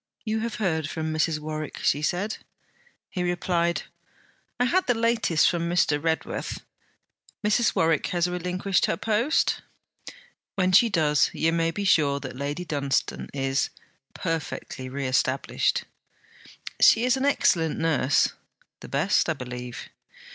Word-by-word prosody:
'You 220 Hz, 0 st, -1 dB
have 230 Hz, 0 st, -3 dB
heard 160 Hz, -7 st, -1 dB
from 160 Hz, 0 st, -3 dB
Mrs. 155 Hz, 0 st, +1 dB
Warwick?' 155 Hz, 0 st, -5 dB
she 145 Hz, -, +2 dB
said. 185 Hz, +7 st, -1 dB, 0.7 s
He 180 Hz, -, -3 dB
replied, 175 Hz, -1 st, 0 dB, 0.8 s
'I 245 Hz, -, +3 dB
had 370 Hz, +9 st, +1 dB
the 245 Hz, -, +3 dB
latest 225 Hz, -8 st, +2 dB
from 170 Hz, -1 st, 0 dB
Mr. 155 Hz, -4 st, +2 dB
Redworth.' 160 Hz, -1 st, -2 dB, 0.8 s
'Mrs. 215 Hz, +2 st, +2 dB
Warwick 165 Hz, -1 st, +2 dB
has 175 Hz, -2 st, 0 dB
relinquished 180 Hz, +2 st, 0 dB
her -, -, -1 dB
post?' 230 Hz, +8 st, +1 dB, 0.9 s
'When 185 Hz, -2 st, +2 dB
she 230 Hz, +6 st, +6 dB
does, 155 Hz, -6 st, +3 dB
you 165 Hz, +1 st, +1 dB
may 165 Hz, 0 st, +1 dB
be 200 Hz, +5 st, -3 dB
sure 150 Hz, -7 st, +3 dB
that -, -, -7 dB
Lady 145 Hz, +6 st, -4 dB
Dunstane 140 Hz, -4 st, -1 dB
is, 135 Hz, -1 st, 0 dB, 0.5 s
perfectly 155 Hz, -5 st, -4 dB
reestablished.' 130 Hz, -1 st, 0 dB, 1.0 s
'She 225 Hz, -, +6 dB
is 255 Hz, -, +3 dB
an 265 Hz, +1 st, -1 dB
excellent 165 Hz, -, +2 dB
nurse.' 145 Hz, -5 st, +2 dB, 0.5 s
'The -, -, -11 dB
best, 160 Hz, +7 st, +2 dB
I -, -, +2 dB
believe.' 125 Hz, -3 st, -7 dB
165 Hz, 135 wpm, -25 LUFS, 150-195 Hz, 1.0 s, she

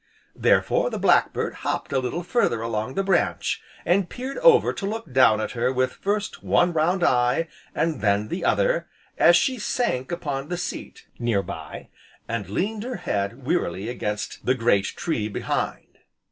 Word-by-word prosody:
Therefore -, -, +2 dB
the -, -, -4 dB
black -, -, +4 dB
bird -, -, -2 dB
hopped -, -, -2 dB
a 135 Hz, -, +3 dB
little 130 Hz, +7 st, -3 dB
further 175 Hz, -, +1 dB
along 115 Hz, +2 st, -3 dB
the 195 Hz, -, +1 dB
branch, 190 Hz, -2 st, 0 dB, 0.2 s
and 180 Hz, +1 st, +2 dB
peered 260 Hz, +2 st, -5 dB
over -, -, +5 dB
to 195 Hz, -, -4 dB
look 220 Hz, -, -5 dB
down 125 Hz, -5 st, +5 dB
at 110 Hz, -, -2 dB
her 125 Hz, +1 st, 0 dB
with 130 Hz, 0 st, 0 dB
first 205 Hz, +1 st, -2 dB
one 175 Hz, 0 st, +2 dB
round 175 Hz, +3 st, +1 dB
eye, 125 Hz, +5 st, +2 dB, 0.3 s
and 160 Hz, -2 st, 0 dB
then 105 Hz, 0 st, +1 dB
the 180 Hz, -, -3 dB
other, -, -, +2 dB, 0.3 s
as 170 Hz, -, +7 dB
she 255 Hz, +8 st, +2 dB
sank 130 Hz, -, -1 dB
upon 145 Hz, -5 st, -3 dB
the 175 Hz, -, -2 dB
seat, 175 Hz, -, -6 dB
near 115 Hz, -5 st, +1 dB
by, -, -, -8 dB, 0.4 s
and 110 Hz, -5 st, -3 dB
leaned 205 Hz, -, -2 dB
her 250 Hz, +2 st, -4 dB
head 105 Hz, +6 st, -2 dB
wearily 110 Hz, -, -1 dB
against 105 Hz, -4 st, -4 dB
the 130 Hz, -, +2 dB
great 115 Hz, -5 st, +2 dB
tree, 115 Hz, -8 st, -2 dB
behind. 100 Hz, -, -3 dB
135 Hz, 170 wpm, -24 LUFS, 115-190 Hz, 0.4 s, as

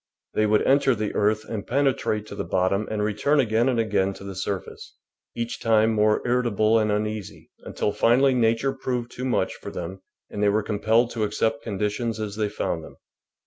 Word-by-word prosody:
They 110 Hz, -, +2 dB
would 105 Hz, 0 st, +3 dB
enter 135 Hz, -1 st, +3 dB
the 105 Hz, -1 st, -3 dB
earth 110 Hz, +1 st, +1 dB
and 105 Hz, -3 st, -5 dB
penetrate 130 Hz, -5 st, 0 dB
to 100 Hz, -, -9 dB
the -, -, -3 dB
bottom 95 Hz, +4 st, 0 dB
and 105 Hz, -1 st, -1 dB
return 110 Hz, +8 st, +1 dB
again 120 Hz, 0 st, +2 dB
and 120 Hz, -3 st, +1 dB
again 100 Hz, -3 st, +1 dB
to -, -, -11 dB
the 100 Hz, 0 st, -6 dB
surface, 95 Hz, +1 st, -5 dB, 0.4 s
each 115 Hz, 0 st, -4 dB
time 110 Hz, 0 st, +3 dB
more 105 Hz, 0 st, +2 dB
irritable 115 Hz, -3 st, +2 dB
and 105 Hz, -1 st, +1 dB
uneasy, 105 Hz, -1 st, -4 dB
until 105 Hz, -, -1 dB
finally 125 Hz, +6 st, +3 dB
Nature 115 Hz, +2 st, +2 dB
proved 125 Hz, -2 st, -3 dB
too 125 Hz, -, -5 dB
much 130 Hz, -, 0 dB
for -, -, -9 dB
them 90 Hz, +3 st, -6 dB, 0.3 s
and 105 Hz, -, -4 dB
they 105 Hz, -, +4 dB
were 105 Hz, +1 st, +1 dB
compelled 110 Hz, +3 st, +1 dB
to 110 Hz, -, -2 dB
accept 110 Hz, +2 st, -1 dB
condi 105 Hz, -1 st, -1 dB
tions 115 Hz, +1 st, -3 dB
as 105 Hz, -2 st, -4 dB
they 105 Hz, -1 st, -1 dB
found 85 Hz, -5 st, -3 dB
them. -, -, -13 dB
110 Hz, 195 wpm, -24 LUFS, 105-120 Hz, 0.4 s, they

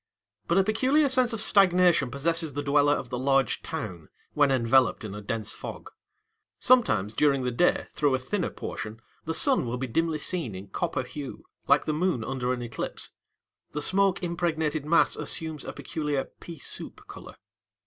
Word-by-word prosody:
But 170 Hz, -, +2 dB
a 195 Hz, -, +5 dB
peculiar 260 Hz, +8 st, +2 dB
sense 255 Hz, -2 st, +3 dB
of 225 Hz, -, -1 dB
stagnation 180 Hz, -9 st, +4 dB
possesses 160 Hz, +4 st, 0 dB
the 145 Hz, +2 st, -3 dB
dweller 145 Hz, 0 st, +3 dB
of 125 Hz, -, -5 dB
the 125 Hz, -, -2 dB
large 135 Hz, 0 st, +1 dB
town, 95 Hz, -, -6 dB, 0.2 s
when 145 Hz, -1 st, +3 dB
enveloped 125 Hz, -2 st, +2 dB
in 100 Hz, -, -6 dB
a 105 Hz, -, -7 dB
dense 110 Hz, +1 st, -3 dB
fog. -, -, -8 dB, 0.7 s
Sometimes 110 Hz, -, +3 dB
during 140 Hz, +1 st, +2 dB
the 125 Hz, -, -1 dB
day, 175 Hz, +9 st, +2 dB
through 145 Hz, -3 st, +2 dB
a -, -, +1 dB
thinner 175 Hz, +9 st, -2 dB
portion, 110 Hz, +1 st, -7 dB, 0.3 s
the 160 Hz, -, -2 dB
sun 275 Hz, -2 st, +4 dB
will 120 Hz, +2 st, -2 dB
be 130 Hz, -, -3 dB
dimly 160 Hz, +6 st, 0 dB
seen 155 Hz, -, -2 dB
in 95 Hz, +2 st, -9 dB
copper 145 Hz, -, -2 dB
hue, 140 Hz, +2 st, -8 dB, 0.2 s
like -, -, +4 dB
the 155 Hz, -, 0 dB
moon 160 Hz, -6 st, 0 dB
under 125 Hz, 0 st, -2 dB
an 125 Hz, -1 st, -2 dB
eclipse. 115 Hz, -2 st, -4 dB, 0.6 s
The 150 Hz, -, -2 dB
smoke 195 Hz, +1 st, +2 dB
impregnated 160 Hz, -3 st, -1 dB
mass 165 Hz, +2 st, +4 dB
assumes 160 Hz, -2 st, -1 dB
a -, -, -6 dB
peculiar 150 Hz, -3 st, -3 dB, 0.2 s
"pea 170 Hz, -1 st, -9 dB
soup" -, -, -6 dB
colour. -, -, -11 dB
145 Hz, 175 wpm, -27 LUFS, 125-170 Hz, 0.7 s, a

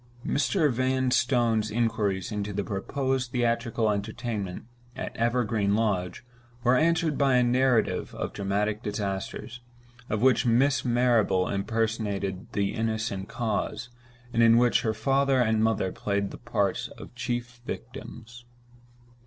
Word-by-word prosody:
Mr. 150 Hz, 0 st, +2 dB
Vanstone's 125 Hz, -3 st, +1 dB
inquiries 105 Hz, -3 st, 0 dB
into 105 Hz, -1 st, -3 dB
the 100 Hz, 0 st, -2 dB
proposed 130 Hz, +6 st, -2 dB
theatrical 115 Hz, -3 st, +1 dB
entertainment 105 Hz, -2 st, -4 dB, 0.3 s
at -, -, -5 dB
Evergreen 115 Hz, -4 st, +1 dB
Lodge 100 Hz, -3 st, -1 dB, 0.4 s
were 125 Hz, +1 st, +4 dB
answered 160 Hz, 0 st, +2 dB
by 135 Hz, -2 st, +4 dB
a 125 Hz, -, +5 dB
narrative 125 Hz, -1 st, +1 dB
of -, -, -4 dB
dramatic 105 Hz, +2 st, -1 dB
disasters; 105 Hz, +3 st, -4 dB, 0.5 s
of 110 Hz, +2 st, -1 dB
which 130 Hz, 0 st, +4 dB
Miss 130 Hz, +4 st, +3 dB
Marrable 120 Hz, -6 st, +2 dB
impersonated 100 Hz, -2 st, -2 dB
the 100 Hz, -1 st, 0 dB
innocent 110 Hz, -3 st, -2 dB
cause, 115 Hz, +1 st, -2 dB, 0.4 s
and 115 Hz, -, +3 dB
in 115 Hz, 0 st, +6 dB
which 120 Hz, 0 st, +4 dB
her 110 Hz, -1 st, -1 dB
father 135 Hz, +4 st, +2 dB
and 110 Hz, -2 st, +2 dB
mother 110 Hz, -4 st, +1 dB
played 100 Hz, -1 st, -2 dB
the -, -, -9 dB
parts -, -, -1 dB
of -, -, -11 dB
chief 120 Hz, -1 st, -4 dB
victims. 120 Hz, 0 st, -8 dB
115 Hz, 125 wpm, -27 LUFS, 105-125 Hz, 0.5 s, in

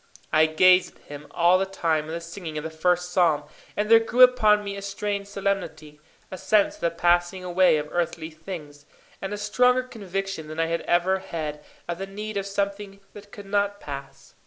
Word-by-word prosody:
I 155 Hz, 0 st, +5 dB
gazed 180 Hz, +3 st, +4 dB
at -, -, -25 dB
him 145 Hz, 0 st, -10 dB
all 175 Hz, +4 st, +3 dB
the 195 Hz, -, +1 dB
time 165 Hz, -5 st, -1 dB
of 155 Hz, -, -8 dB
the 170 Hz, -, -4 dB
singing 165 Hz, -2 st, -7 dB
of 150 Hz, -, -4 dB
the 160 Hz, -, -5 dB
first 180 Hz, +2 st, 0 dB
psalm, 170 Hz, -5 st, +2 dB, 0.3 s
and 210 Hz, -, 0 dB
there 225 Hz, +1 st, +7 dB
grew 240 Hz, +3 st, +4 dB
upon 215 Hz, -5 st, +5 dB
me 200 Hz, -1 st, -5 dB
a 200 Hz, -, -7 dB
strange 200 Hz, 0 st, -3 dB
solemnity, 195 Hz, -7 st, -4 dB, 0.3 s
a 185 Hz, -, -7 dB
sense 200 Hz, +2 st, +2 dB
of -, -, -17 dB
the 170 Hz, -, +2 dB
passing 175 Hz, +2 st, +1 dB
away 180 Hz, -2 st, +3 dB
of 150 Hz, 0 st, -3 dB
earthly 165 Hz, -2 st, -2 dB
things, 155 Hz, -3 st, -9 dB, 0.3 s
and 195 Hz, -, -4 dB
a 205 Hz, -, -3 dB
stronger 250 Hz, +5 st, +2 dB
conviction 195 Hz, -8 st, -5 dB
than 155 Hz, +1 st, -7 dB
I 165 Hz, -, +2 dB
had 165 Hz, +1 st, -2 dB
ever 180 Hz, +2 st, +2 dB
had 150 Hz, -5 st, -6 dB, 0.2 s
of 170 Hz, 0 st, -4 dB
the 195 Hz, -, -4 dB
need 210 Hz, +2 st, -7 dB
of 200 Hz, 0 st, -2 dB
something 200 Hz, 0 st, -3 dB
that 205 Hz, 0 st, -13 dB
could 205 Hz, 0 st, -10 dB
not 205 Hz, 0 st, 0 dB
pass. 140 Hz, -1 st, -9 dB
185 Hz, 205 wpm, -25 LUFS, 165-200 Hz, 0.3 s, there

